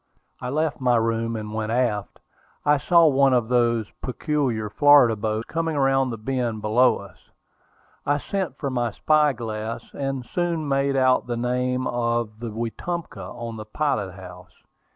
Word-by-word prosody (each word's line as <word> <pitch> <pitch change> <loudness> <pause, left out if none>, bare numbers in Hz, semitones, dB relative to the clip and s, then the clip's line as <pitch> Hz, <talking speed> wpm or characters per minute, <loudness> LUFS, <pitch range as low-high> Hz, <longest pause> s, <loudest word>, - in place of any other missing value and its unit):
I 125 - -4
left 155 +1 -1
my 125 -1 +3
room 115 0 0
and 105 -1 -5
went 110 0 -2
aft. 115 -5 -1 0.5
I 150 0 +4
saw 170 +3 +5
one 140 -3 +4
of 120 -2 0
those 120 -2 +2 0.2
peculiar 130 -5 -1
Florida 140 0 +5
boats 110 +1 -2
coming 165 -1 -2
around 135 -1 +2
the 115 - -4
bend 115 -2 -2
below 120 +4 +4
us. 100 -5 -12 0.9
I 145 +1 +1
sent 190 +4 -3
for 140 -3 -3
my 120 -2 0
spy 150 -1 +3
glass, 110 -1 -5
and 135 -2 -3
soon 170 -2 -2
made 140 0 +1
out 130 -2 +3
the 120 -1 -2
name 125 +1 -1
of 115 -3 -1
the 120 0 -5
Wetumpka 120 +10 -4
on 115 -2 -6
the 110 - -7
pilot 110 -6 -1
house. 90 -1 -13
125 Hz, 160 wpm, -24 LUFS, 110-140 Hz, 0.9 s, saw